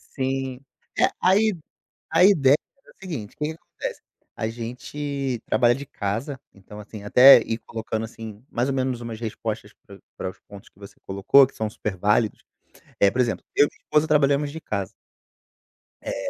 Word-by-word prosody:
Sim. 130 -1 -2 0.4
É, - - +6
a 185 +1 +4
i 215 0 +3 0.6
a 165 +2 +4
ideia 145 -8 +6 0.3
era - - -19
o - - -48
seguinte, 150 - -6
o - - -45
que 150 - -2
que 155 - -3
acontece? 165 - -7 0.4
A 110 - -2
gente 130 +3 -4
trabalha 120 -1 +3
de 140 +3 -7
casa, 115 +5 -4 0.2
então, 100 +2 -13
assim, 105 0 -10
até 125 +7 +9
ir 115 0 -3
colocando 110 -1 -4
assim 110 -1 -9
mais 120 +3 -1
ou 135 - 0
menos 130 -2 -1
umas 115 -2 -6
respostas 110 -2 -5
pra - - -13 0.2
pra 95 - -3
os - - -17
pontos 100 -1 -14
que - - -30
você 100 0 -12
colocou, 100 +8 +5
que 135 - -18
são 110 - -2
super 105 -2 -4
válidos, 105 +3 +1 0.6
eh, 100 - +6
por 125 +5 0
exemplo, 120 -2 -2
eu 145 - +6
e - - -11
minha - - -27
esposa 150 0 +2
trabalhamos 145 -1 +2
de 160 - -7
casa. 100 - -3 1.1
É, - - -4
120 Hz, 190 wpm, -24 LUFS, 110-140 Hz, 1.1 s, até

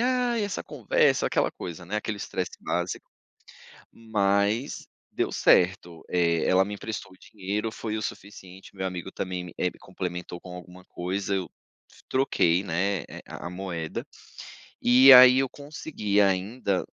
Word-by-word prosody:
"Ai, 245 -2 +1
essa 200 - -4
conversa", - - +1
aquela - - +1
coisa, 90 0 -8
né, 105 +5 -3
aquele 105 0 -3
estresse 95 -2 -4
básico. - - -3 0.9
Mas 105 +2 0 0.3
deu - - -1
certo, 90 -2 +2
eh, 85 -2 +2
ela 95 +1 +4
me 105 - -6
emprestou 105 0 -6
o - - -19
dinheiro, 105 +2 -4
foi 110 -1 -4
o 110 - -4
suficiente, 95 -2 -9
meu 95 0 -3
amigo 90 +1 -6
também, 90 -2 -5
eh, - - -1
me 90 - -2
complementou 90 -1 -6
com 90 -1 -9
alguma 90 +1 -12
coisa, 95 +3 -3
eu 95 -2 -3 0.6
troquei, 95 -9 +2
né, 95 +1 -1 0.2
a - - -7
a - - -5
moeda 90 -3 -5 0.8
e 130 +3 +7
aí 125 +1 +9
eu 135 - +1
consegui 140 -8 -3
ainda 100 +1 0
95 Hz, 145 wpm, -26 LUFS, 90-110 Hz, 0.9 s, aí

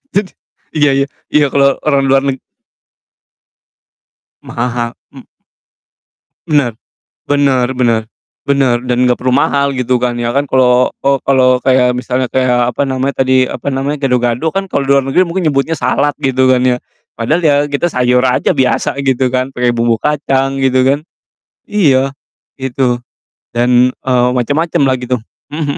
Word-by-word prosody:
Jadi 200 -2 0 0.4
iya 145 -2 +3
iya 140 - +1 0.3
iya, 150 -1 +4
kalo 140 - +2 0.2
orang 140 -2 +2
luar 135 0 +4
neg 135 -1 -2 2.0
Maha 120 +1 -3
ha 120 -1 -2 0.2
mmm. - - -11 1.3
Bener. 145 -7 +1 0.5
Bener 135 -3 +1
bener 120 -3 +1 0.4
bener, 135 -3 +2
dan 125 0 +1
gak 125 - +2
perlu 130 0 -1
mahal 140 +2 +1
gitu 125 -1 0
kan, 120 0 -1
ya 120 - -1
kan, 140 - +2
kalo 125 -2 +2
oh, 140 0 +2
kalo 130 -2 +2
kayak 125 -1 +3
misalnya 125 0 -2
kayak, 125 -1 +1
apa 140 +3 -1
namanya 135 0 -1
tadi, 130 -1 +2
apa 140 - -4
namanya, 135 +3 -2
gado-gado 125 +4 0
kan, 195 0 -3
kalo 140 - -1
luar 140 0 +3
negeri 135 +8 +1
mungkin 170 -1 -1
nyebutnya 140 +2 0
salad, 145 -2 0
gitu 130 -1 +1
kan 125 - +2
ya. 125 -1 +2 0.4
Padahal 150 +10 0
ya 150 -4 +3
kita 145 +4 -1
sayur 125 -3 +1
aja 125 -1 +1
biasa 135 0 0
gitu 130 -2 0
kan, 130 +1 0
pake 125 -2 -1
bumbu 115 -1 +1
kacang, 135 0 -1
gitu 130 -1 +2
kan. 140 +2 +2 0.6
Iya, 135 -10 +2 0.5
gitu. 125 -2 -1 0.5
Dan, 125 +1 +3
eee, 125 -1 0
macem-macem 150 +6 0
lah 130 -2 +2
gitu. 125 0 -2 0.4
Mhm 160 - -3
130 Hz, 155 wpm, -14 LUFS, 125-140 Hz, 2.0 s, iya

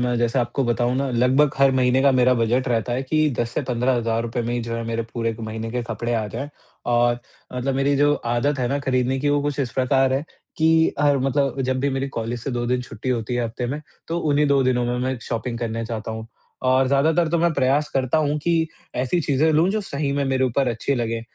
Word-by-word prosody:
मैं 125 0 0
जैसे 120 +2 +1
आपको 120 +3 0
बताऊँ 120 +1 +1
ना 135 +1 0
लगभग 130 +4 +3
हर 135 0 +5
महीने 130 0 +3
का 140 - +5
मेरा 125 0 +4
बजट 120 +3 +1
रहता 120 0 0
है 125 +2 -1
कि 155 +3 +2
10 115 -1 0
से - - +1
15 125 +1 +1
हज़ार 115 -1 0
रुपये 120 +1 -3
में 120 +1 -2
ही 120 - -1
जो 115 0 -4
है, 115 - -3
मेरे 115 0 -2
पूरे 115 -2 -1
महीने 110 0 -5
के 125 +1 -2
कपड़े 115 +1 -3
आ 110 -2 -1
जाएँ 130 +7 -5 0.5
और 120 0 +3 0.3
मतलब 130 +2 -2
मेरी 135 +1 +2
जो 145 +1 +4
आदत 120 +3 -1
है 125 - 0
ना 140 +2 0
खरीदने 130 -1 0
की, 145 - 0
वो 145 0 +2
कुछ 145 0 -2
इस 125 -4 -2
प्रकार 130 0 +2
है 135 +2 0 0.3
कि 160 0 +3
हर 145 -1 +3
मतलब 135 0 0
जब 130 0 0
भी 140 +1 +1
मेरी 135 +1 -2
कॉलेज 115 +1 -3
से 140 - -3
2 120 -1 -2
दिन 125 +1 0
छुट्टी 115 0 -7
होती 120 -1 -1
है 120 - 0
हफ़्ते 115 +2 -4
में, 140 +5 -3 0.3
तो 165 +1 -1
उन्हीं 150 -2 +2
2 140 -1 +4
दिनों 125 -1 +1
में 120 0 -1
मैं 130 +1 -1
शॉपिंग 115 0 -3
करने 115 -1 -3
जाता 110 -1 -5
हूँ। 110 0 -6 0.4
और 130 +1 +4
ज़्यादातर 155 +5 +3
तो 170 +2 +1
मैं 170 0 +2
प्रयास 140 +1 +1
करता 135 +3 +1
हूँ 150 -1 0
कि 165 -1 +2 0.3
ऐसी 130 +7 0
चीजें 150 +1 +2
लूँ 160 +4 +3
जो 215 +2 0
सही 140 -7 -2
में 140 0 0
मेरे 130 -1 +1
ऊपर 130 +1 +1
अच्छी 120 +4 -1
लगें, 115 -2 -2
130 Hz, 245 wpm, -22 LUFS, 120-140 Hz, 0.5 s, हर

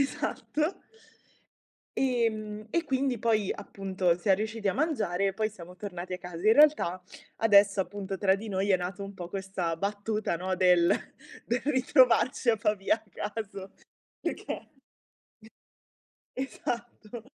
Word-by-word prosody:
esatto. 295 +2 -2 1.4
Ehm, 220 -4 0
e 340 - +1
quindi 265 -3 0
poi 215 -3 +1
appunto 185 -3 -1
siam 190 +2 +3
riusciti 215 +1 -3
a 190 - +2
mangiare 215 - 0
e 195 - -1
poi 215 +2 0
siamo 180 -4 -12
tornati 180 -1 -6
a 180 - -2
casa. 180 -1 -9
In 220 - +8
realtà 290 - +4 0.4
adesso 200 -2 +5
appunto 195 0 -5
tra 190 0 +3
di 215 +3 -7
noi 195 +1 +1
è 185 - +5
nato 185 +3 -5
un 195 - -7
po' 175 -3 -7
questa 190 -3 -3
battuta, 205 +1 -1
no, 185 +2 -2
del 180 -2 +5 0.6
del 240 +1 0
ritrovarci 255 -3 +4
a 230 - +4
Pavia 210 -1 +1
a 225 - -16 0.3
caso 200 -3 -6 0.5
perché - - -4 1.7
Esatto, 240 -3 -5
205 Hz, 135 wpm, -29 LUFS, 190-230 Hz, 1.7 s, In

